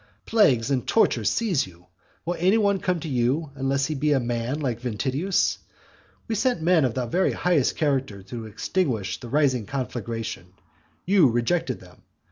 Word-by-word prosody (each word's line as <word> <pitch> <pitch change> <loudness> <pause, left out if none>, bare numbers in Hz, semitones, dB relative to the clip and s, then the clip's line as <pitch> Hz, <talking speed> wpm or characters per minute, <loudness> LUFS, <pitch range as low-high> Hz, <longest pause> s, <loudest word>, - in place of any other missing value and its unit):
Plagues 140 - +3
and 130 -3 0
tortures 225 - +3
seize 190 - 0
you! 90 -1 -17 0.4
Will 175 +1 -1
any 190 +6 +4
one 200 -3 +2
come 180 -2 0
to 165 - -5
you, 135 +3 0
unless 135 0 0
he 155 - -2
be 150 +1 +1
a 135 - +3
man 120 +3 -2
like 125 -6 -2
Ventidius? 135 - 0 0.7
We 230 - -2
sent 245 0 +1
men 165 -2 +3
of 120 - -1
the 130 -1 -1
very 180 +11 +1
highest 170 -7 +1
character 135 - -1
to 115 +2 -7
extinguish 110 - -2
the 120 - -9
rising 130 -5 +1
conflagration; 115 -7 -5 0.5
you 185 -7 +5
rejected 130 +4 0
them. 90 -1 -17
135 Hz, 165 wpm, -25 LUFS, 120-175 Hz, 0.7 s, you